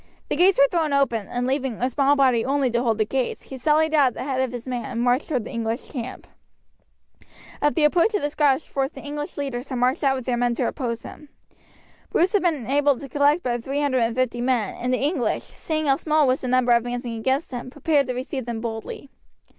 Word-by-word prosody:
The - - 0
gates 360 +4 +4
were 280 - +6
thrown 315 -2 0
open, 235 -7 +1
and 245 0 -2
leaving 265 -1 -1
a 245 - 0
small 275 +2 +2
body 255 -5 +3
only 270 -1 +1
to 235 +1 +1
hold 230 -3 +1
the 215 - +2
gates, 260 +2 -2
he 270 - -9
sallied 310 +4 +2
out 290 -3 +5
at 250 - -2
the - - -5
head 260 -1 -1
of 260 -2 -1
his 245 0 -7
men 245 -2 -3
and 250 -3 -5
marched 245 +3 +1
toward 255 -7 0
the - - -7
English 230 0 -3
camp. 250 -4 -6 1.4
At 295 0 +2
the 315 - +2
approach 350 +8 +3
of 410 - -1
the 290 - -1
Scottish 290 -1 +2
force 270 -2 -1
the 270 - -11
English 295 0 -6
leaders 270 -2 -4
had 260 - -3
marched 255 +6 +1
out 270 -1 +3
with 260 -2 -5
their 245 -2 0
men 240 0 +1
to - - 0
oppose 235 -5 -3
them. 300 -1 -11 0.8
Bruce 360 +4 +2
had 410 - +3
been 310 -9 0
able 285 +1 +2
to 275 - -8
collect 290 +5 +2
but 240 -2 -2
three 275 +3 -2
hundred 275 -3 +1
and 230 -1 0
fifty 250 -2 0
men, 245 -5 0
and 250 +1 -3
the 255 - +2
English, 280 -5 0
seeing 310 -1 -4
how 275 -1 +3
small 310 -1 +2
was 255 0 +1
the 255 - -4
number 250 -1 +2
advancing 240 0 0
against 265 +7 -1
them, 245 0 -5
prepared 290 0 +1
to 250 - -3
receive 260 0 -4
them 235 -2 -3
boldly. 225 +4 -6
260 Hz, 240 wpm, -23 LUFS, 245-290 Hz, 1.4 s, were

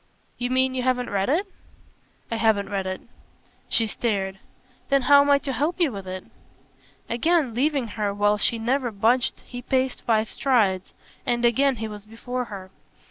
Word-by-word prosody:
"You 245 0 -1
mean 260 0 +2
you 255 - -1
haven't 250 -1 0
read 195 +1 0
it?" 340 +8 +2 0.9
"I 230 - 0
haven't 215 -3 +2
read 195 -1 -1
it." 185 0 -4 0.7
She 230 - +2
stared. 195 -4 -2 0.5
"Then 275 -1 +3
how 285 +2 +7
am 285 - +1
I 285 - +6
to 275 -1 -4
help 300 +9 -1
you 330 -6 +3
with 195 -3 -7
it?" 185 0 -5 0.8
Again 280 +2 +1
leaving 270 -1 0
her 210 -1 -2
while 205 +1 +2
she 230 - +2
never 245 +3 0
budged 230 +4 +1
he 245 0 -8
paced 260 +1 0
five 220 -1 +1
strides, 205 -8 +1 0.3
and 240 0 0
again 265 +3 +3
he 220 -1 -4
was 210 -1 -9
before 245 +3 -4
her. 190 -4 -9
235 Hz, 175 wpm, -24 LUFS, 205-260 Hz, 0.9 s, how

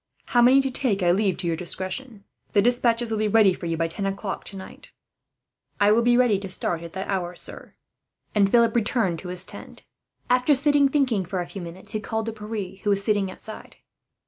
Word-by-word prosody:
How 240 - +4
many 255 +3 +6
to 270 -1 -2
take, 220 -7 0
I 175 - +4
leave 195 0 +1
to 185 - -5
your 170 -1 0
discretion. 195 +6 -5 0.3
The 205 - +5
despatches 240 -1 +2
will 220 - -1
be 215 - +1
ready 210 -2 +5
for 175 - -6
you, 165 -1 -1
by 165 0 0
ten 195 +4 -3
o'clock 195 0 -4
tonight." 195 -1 -9 0.9
"I 205 - +5
shall 220 +2 +4
be 240 +1 +4
ready 240 -6 +3
to 195 -1 -7
start 175 -2 -3
at 170 -1 -9
that 190 0 -5
hour, 180 -3 -2
sir," - - -11 0.6
and 200 -2 +3
Philip 235 +1 +4
returned 215 -6 +1
to 185 - -9
his 180 +1 -3
tent. - - -11 0.4
After 250 +4 +3
sitting 285 0 +3
thinking 260 -8 +1
for 185 +1 -4
a 175 - -2
few 195 - -8
minutes 175 +4 -9
he 215 - -2
called 220 +1 -3
to 225 - -4
Pierre, 210 -3 -6
who 205 - -1
was 200 -1 +1
sitting 205 -2 +1
outside. 215 +3 -9
205 Hz, 215 wpm, -24 LUFS, 185-235 Hz, 0.9 s, many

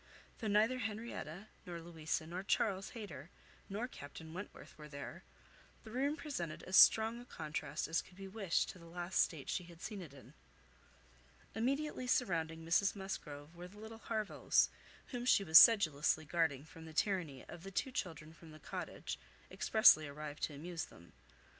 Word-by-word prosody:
Though 220 - -3
neither 215 +5 +3
Henrietta, 215 -5 -5
nor 175 -3 -6
Louisa, 160 -2 -3
nor 175 +3 -4
Charles 195 -1 0
Hayter, 185 - -8 0.4
nor 215 +5 -2
Captain 160 - -10
Wentworth 185 +4 -9
were 150 -1 -11
there, 140 -1 -8 0.6
the 220 - -10
room 280 +5 0
presented 175 - -4
as 185 - -2
strong 225 +4 +7
a - - -12
contrast 155 - -4
as 165 - +1
could 180 - -18
be 195 0 -7
wished 195 -3 0
to 185 - -9
the 170 - -13
last 175 +2 0
state 155 -5 -1
she 180 - -2
had 170 -1 -14
seen 205 +1 -5
it 165 -6 -9
in. 140 -2 -15 1.2
Immediately 260 +3 -1
surrounding 165 -9 0
Mrs 195 +5 +3
Musgrove 160 -6 -6
were 175 +1 -8
the 200 +3 -16
little 220 +1 -9
Harvilles, 220 -3 +1 0.4
whom 245 -2 -4
she 245 -5 +4
was 160 -3 +10
sedulously 160 -8 +5
guarding 160 -4 +1
from 160 0 -12
the 160 - -10
tyranny 165 -7 -1
of 170 - -10
the 195 - -7
two 225 +7 -1
children 160 - -4
from 165 0 -15
the 155 0 -12
Cottage, - - -5 0.3
expressly 155 -9 +6
arrived 150 +1 -7
to 150 - -2
amuse 165 +2 -4
them. 85 -1 -17
175 Hz, 170 wpm, -36 LUFS, 160-215 Hz, 1.2 s, was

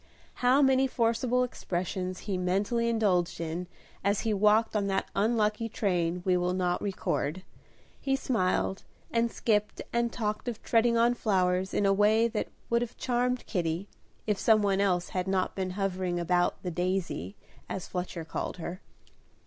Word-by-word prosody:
How 255 +3 +5
many 265 0 +4
forcible 245 0 +1
expressions 185 -5 -3
he 200 -2 -3
mentally 200 +6 0
indulged 185 -6 +1
in 170 +2 -3 0.4
as 200 +1 +2
he 220 -2 0
walked 210 +2 +3
on 200 -1 +1
that 195 -1 0
unlucky 215 +1 +1
train 180 -4 0
we 185 -1 +3
will 180 +1 0
not 180 -1 0
record; 185 -3 -2 0.6
he 270 -1 +1
smiled 195 -6 0 0.3
and 230 0 +1
skipped 210 -2 0
and 235 0 +1
talked 215 0 -3
of 235 -2 -3
treading 235 0 +3
on 235 +1 +4
flowers 190 -4 +1
in 205 - +1
a 195 - +4
way 215 +3 +4
that - - -2 0.2
would 235 0 +2
have 240 -1 -4
charmed 250 0 0
Kitty, 175 0 -2 0.4
if 210 -2 0
some 215 -2 +4
one 200 -1 +2
else 180 -3 +1
had 185 0 -2
not 190 -1 0
been 190 -1 -2
hovering 185 -3 -1
about 175 +1 +1
"The 180 - -2
Daisy," 175 - -2 0.3
as 190 - -4
Fletcher 180 -2 -4
called 165 - -4
her. 175 +2 -6
200 Hz, 160 wpm, -29 LUFS, 180-230 Hz, 0.6 s, How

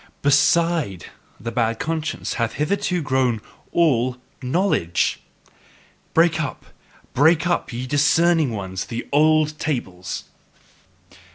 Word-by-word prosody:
BESIDE 145 - +2 0.3
the 115 +2 -5
bad 115 -1 0
conscience 155 +2 -3
hath 115 -2 -1
hitherto 180 +2 -1
grown 130 -4 +1 0.3
all 130 -7 +2 0.2
KNOWLEDGE! 130 - 0 0.9
Break 165 -1 +4
up, 145 - -5 0.5
break 160 +4 +4
up, 175 -6 0
ye 125 +1 -4
discerning 155 +3 +3
ones, 95 -4 -4
the 120 0 -6
old 155 0 +3
tables! 95 - -3
145 Hz, 100 wpm, -22 LUFS, 115-160 Hz, 0.9 s, Break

